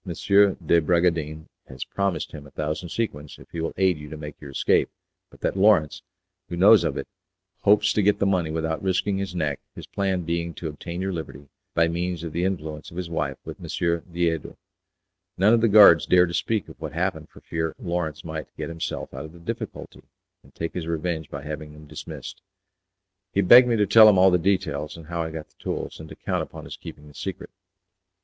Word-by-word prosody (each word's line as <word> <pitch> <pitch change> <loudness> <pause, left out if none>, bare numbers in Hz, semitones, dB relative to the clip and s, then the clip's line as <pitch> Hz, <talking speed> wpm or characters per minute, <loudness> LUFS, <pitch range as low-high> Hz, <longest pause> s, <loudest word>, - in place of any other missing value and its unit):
de 95 -2 +3
Bragadin 80 -2 0 0.2
has 65 -1 -7
promised 100 -2 -2
him 75 -1 -10
a - - -14
thousand 75 +4 -4
sequins 75 -9 -4
if - - -15
he 85 - -4
will 80 - -2
aid 95 -4 +2
you 75 0 -9
to 80 - -7
make 75 -1 -9
your 70 - -9
escape 70 - +2 0.4
but - - -19
that - - 0
Lawrence, 90 -8 +3 0.5
who 85 - -4
knows 100 +3 +7
of 80 -4 -1
it, - - -4 0.5
hopes 105 +1 +4
to 105 - +2
get 105 +1 +3
the - - +1
money 90 -5 +1
without 80 +3 -2
risking 95 +1 0
his 95 -2 -4
neck, 75 -5 -1 0.2
his - - -8
plan 95 -2 -1
being 85 0 -2
to 80 - -5
obtain 85 +4 -6
your 95 0 -2
liberty 70 -4 -7 0.3
by 85 0 +4
means 85 0 -2
of 80 -2 -5
the 85 - -1
influence 80 -5 -3
of 85 - -12
his 90 -2 -4
wife 70 -4 -2
with - - -8
M. - - -8 0.4
Diedo. 85 -3 -1 0.8
None 100 +5 +5
of 115 - +4
the 115 - +4
guards 100 -6 +8
dare 90 0 +6
to 85 - -6
speak 105 +3 -1
of - - -14
what - - -5
happened - - -2
for - - -16
fear 80 -1 -3
Lawrence 85 - -3
might - - -5
get - - -4
himself 80 0 -5
out 65 +3 -6
of 80 - -12
the 85 - -14
difficulty, 85 - -6 0.4
and - - -22
take 80 - -4
his 85 -3 -4
revenge 80 -1 -2
by 70 0 -7
having 75 0 -6
them 75 0 -13
dismissed." - - -9 0.9
He 100 - +3
begged 120 +6 +8
me 120 - +2
to 105 -2 +3
tell 110 +2 +8
him 100 - +4
all 95 +1 +6
the 90 - +3
details, 80 -5 -1
and 80 - -11
how 85 +1 -3
I 80 - -2
got 80 -1 -7
the - - -34
tools, - - -4
and 80 0 -10
to - - -10
count - - -2
upon - - -8
his - - -7
keeping 75 - -11
the 75 - -15
secret. 95 +4 -6
85 Hz, 215 wpm, -24 LUFS, 80-95 Hz, 0.9 s, guards